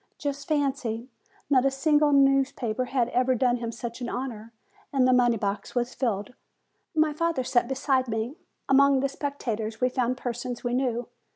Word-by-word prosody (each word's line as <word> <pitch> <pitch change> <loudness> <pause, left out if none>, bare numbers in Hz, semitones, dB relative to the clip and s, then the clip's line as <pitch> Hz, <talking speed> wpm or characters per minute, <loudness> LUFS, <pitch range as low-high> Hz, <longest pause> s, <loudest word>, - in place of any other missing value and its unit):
Just 285 -1 -4
fancy! 270 -5 -1 0.4
Not 260 -3 +4
a 275 - +4
single 295 +2 +3
news 275 -1 +4
paper 240 +1 -2
had 250 -2 0
ever 255 +1 +2
done 245 0 +2
him 230 -1 -4
such 235 +1 -7
an 240 - -3
honor, 230 -4 -5 0.4
and 265 -2 +3
the 255 - +4
money 240 -2 +4
box 200 +3 -3
was 245 +1 0
filled. 235 -2 -2 0.6
My 310 -1 +3
father 330 -3 0
sat 245 -1 +1
beside 265 0 +1
me. 225 +3 -2 0.3
Among 275 0 +5
the 275 - +1
spectators 230 -7 -4
we 250 - +2
found 255 0 0
persons 245 0 -4
we 245 -1 -1
knew. 245 -2 0
255 Hz, 175 wpm, -26 LUFS, 240-275 Hz, 0.6 s, Among